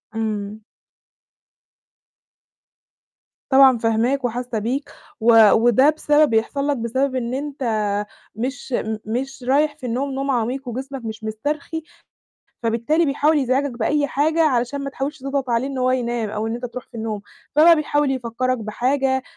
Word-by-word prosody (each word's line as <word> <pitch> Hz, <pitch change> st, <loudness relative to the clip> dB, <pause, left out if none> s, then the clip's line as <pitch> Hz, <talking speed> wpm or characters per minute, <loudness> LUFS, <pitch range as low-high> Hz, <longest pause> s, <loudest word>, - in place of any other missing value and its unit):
إمم. 215 Hz, -1 st, -3 dB, 2.9 s
طبعًا 265 Hz, -2 st, +6 dB
فاهماك، 235 Hz, +4 st, +1 dB
وحاسّة 245 Hz, -1 st, -2 dB
بيك، 260 Hz, +7 st, -3 dB, 0.3 s
و 225 Hz, -2 st, +7 dB
وده 240 Hz, +5 st, +5 dB
بسبب 300 Hz, -1 st, +3 dB
بيحصل 255 Hz, +6 st, 0 dB
لك 285 Hz, -2 st, +1 dB
بسبب 260 Hz, +4 st, -1 dB
إن 245 Hz, -1 st, -2 dB
أنت 280 Hz, 0 st, -4 dB, 0.7 s
مش 265 Hz, +3 st, -4 dB
م 220 Hz, 0 st, -3 dB
مش 255 Hz, +4 st, -4 dB
رايح 290 Hz, +4 st, +2 dB
في 260 Hz, -, -9 dB
النوم، 260 Hz, +4 st, -2 dB
نوم 275 Hz, +1 st, -2 dB
عميق، 250 Hz, +2 st, -2 dB
وجسمك 265 Hz, +1 st, -6 dB
مش 220 Hz, 0 st, -6 dB
مُسترخي، 290 Hz, +9 st, -3 dB, 0.8 s
فبالتالي 235 Hz, +9 st, +1 dB
بيحاول 295 Hz, +2 st, +2 dB
يزعجك 270 Hz, +1 st, +1 dB
بأي 285 Hz, +5 st, 0 dB
حاجة، 310 Hz, +4 st, +1 dB
علشان 265 Hz, -1 st, +1 dB
ما 275 Hz, -, -4 dB
تحاولش 275 Hz, +3 st, -4 dB
تضغط 275 Hz, -1 st, -3 dB
عليه 235 Hz, +2 st, +1 dB
إن 275 Hz, -1 st, -4 dB
هو 255 Hz, 0 st, +2 dB
ينام، 240 Hz, -3 st, -1 dB
أو 215 Hz, +1 st, -3 dB
إن 225 Hz, -, -2 dB
أنت 240 Hz, +1 st, -6 dB
تروح 245 Hz, +1 st, -8 dB
في -, -, -30 dB
النوم، 220 Hz, -2 st, -4 dB, 0.3 s
فبقى 330 Hz, +2 st, +7 dB
بيحاول 295 Hz, -2 st, +1 dB
يفكّرك 255 Hz, 0 st, -1 dB
بحاجة، 265 Hz, +5 st, 0 dB
255 Hz, 145 wpm, -21 LUFS, 230-280 Hz, 2.9 s, و